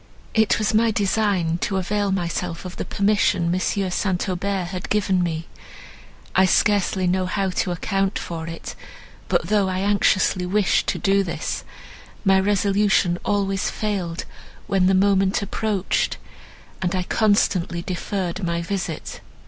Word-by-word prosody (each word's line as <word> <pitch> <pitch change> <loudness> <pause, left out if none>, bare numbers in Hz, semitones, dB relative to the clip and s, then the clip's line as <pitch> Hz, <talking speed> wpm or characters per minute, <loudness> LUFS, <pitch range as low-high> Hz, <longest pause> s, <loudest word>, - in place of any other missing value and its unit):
"It 220 -1 +3
was 215 0 0
my 225 +1 +4
design 200 -5 +1
to 195 - -1
avail 200 +2 0
myself 175 -1 -2
of 180 - -7
the - - -3
permission 200 -4 +1
M. 185 - 0
St. 185 0 -1
Aubert 185 0 -2
had 185 -1 -6
given 195 -3 +2
me. 165 -2 -2 0.9
I 190 - +6
scarcely 195 -1 +2
know 185 +1 +1
how 195 0 -1
to 180 - -1
account 195 +3 -1
for 165 -1 -5
it; 165 0 -7 0.6
but, - - +2
though 205 -3 +2
I 185 0 -1
anxiously 195 -2 +2
wished 195 +2 +1
to - - 0
do 200 -1 +2
this, 170 - -4 0.6
my 190 0 +5
resolution 195 -2 +2
always 195 -2 0
failed, 190 -6 -3 0.4
when 190 -2 +2
the 190 - +4
moment 195 0 +3
approached, 205 -1 -1 0.6
and 185 0 0
I 185 - 0
constantly 185 -4 +1
deferred 185 0 -3
my 170 -1 -1
visit. 180 -3 -4
190 Hz, 140 wpm, -22 LUFS, 180-200 Hz, 0.9 s, I